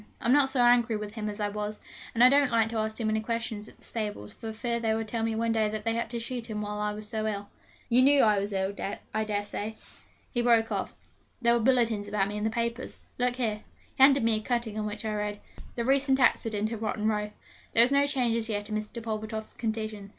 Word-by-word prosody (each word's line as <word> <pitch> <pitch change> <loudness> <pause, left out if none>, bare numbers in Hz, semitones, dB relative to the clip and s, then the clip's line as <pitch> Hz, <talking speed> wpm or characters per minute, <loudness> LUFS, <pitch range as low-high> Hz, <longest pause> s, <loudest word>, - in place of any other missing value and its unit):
I'm 240 - +2
not 280 -2 +5
so 260 -2 +2
angry 240 -2 +4
with 210 0 -6
him 215 -2 -3
as 205 +1 -7
I 205 -1 0
was, 210 +1 -4 0.4
and 235 - +5
I 250 - +9
don't 280 0 +4
like 225 -2 +2
to 230 - -3
ask 220 0 -1
too 230 - -2
many 220 0 +1
questions 225 -2 -3
at - - -16
the - - -22
stables, 210 - -4
for 225 - -7
fear 235 +1 -2
they 220 -1 +1
may 225 - -1
tell 225 +1 -3
me 225 0 0
one 230 +1 0
day 220 -1 +2
that 215 0 -5
they 225 - +1
had 230 -1 -2
to 235 0 -3
shoot 235 0 -5
him 210 -1 -3
while 210 0 -4
I 210 0 0
was 210 0 -6
so 220 0 -2
ill. 205 -1 -4 0.4
You 245 +1 +5
knew 280 +1 +6
I 210 -2 +4
was 200 +1 -3
ill, 195 0 -1 0.4
I 220 - +1
dare 205 -1 -1
say?' 210 +1 -5 0.6
he 240 - +1
broke 230 -2 +3
off: - - -3 0.5
'there 235 0 +5
were 235 - +3
bulletins 230 -4 +2
about 205 -1 0
me 205 - -5
in 210 - -3
the 220 - +2
papers. 235 +2 -3 0.2
Look 245 0 +2
here.' 220 -4 -1 0.3
He - - -3
handed 275 -1 +7
me 225 -1 +3
a - - -4
cutting 235 -2 -2
on 210 - -2
which 210 +1 -6
I 215 - -1
read: 210 0 -3 0.4
'THE 235 - -2
RECENT 270 0 +3
ACCIDENT 220 -4 +2
IN 225 - -4
ROTTEN 215 -1 -1
ROW. 210 -1 0 0.5
There 230 - +8
is 250 - +2
no 280 0 +4
change 250 -5 +2
as 230 0 0
yet 205 -1 -2
in 215 - -2
Mr. 215 +2 -5
Pulvertoft's 220 0 -4
condition. 215 -3 -4
220 Hz, 255 wpm, -28 LUFS, 210-235 Hz, 0.6 s, I